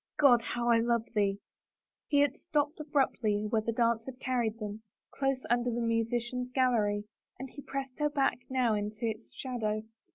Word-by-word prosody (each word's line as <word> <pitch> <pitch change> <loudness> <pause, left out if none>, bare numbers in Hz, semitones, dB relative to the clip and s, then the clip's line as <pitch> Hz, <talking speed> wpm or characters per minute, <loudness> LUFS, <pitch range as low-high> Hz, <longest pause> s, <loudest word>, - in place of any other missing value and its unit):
God, 250 -5 +6
how 240 0 -2
I 230 -1 +6
love 235 -1 +1
thee! 200 -2 +1 0.3
" - - -62
He 285 -1 +4
had 285 -1 +2
stopped 300 0 -1
abruptly 255 -8 +1
where 220 0 +1
the 230 - -1
dance 230 -1 +2
had 260 -1 -8
carried 240 -4 0
them, 210 -1 -5 0.3
close 270 -1 0
under 240 +1 +2
the 240 0 -1
musicians' 240 +2 0
gallery, 230 -6 +2 0.3
and 265 -1 -7
he 285 - -9
pressed 270 -1 -5
her 295 0 +2
back 275 -3 +1
now 255 -4 +2
into 210 +2 -2
its 220 0 -5
shadow. 215 -5 -2
240 Hz, 175 wpm, -31 LUFS, 220-265 Hz, 0.3 s, God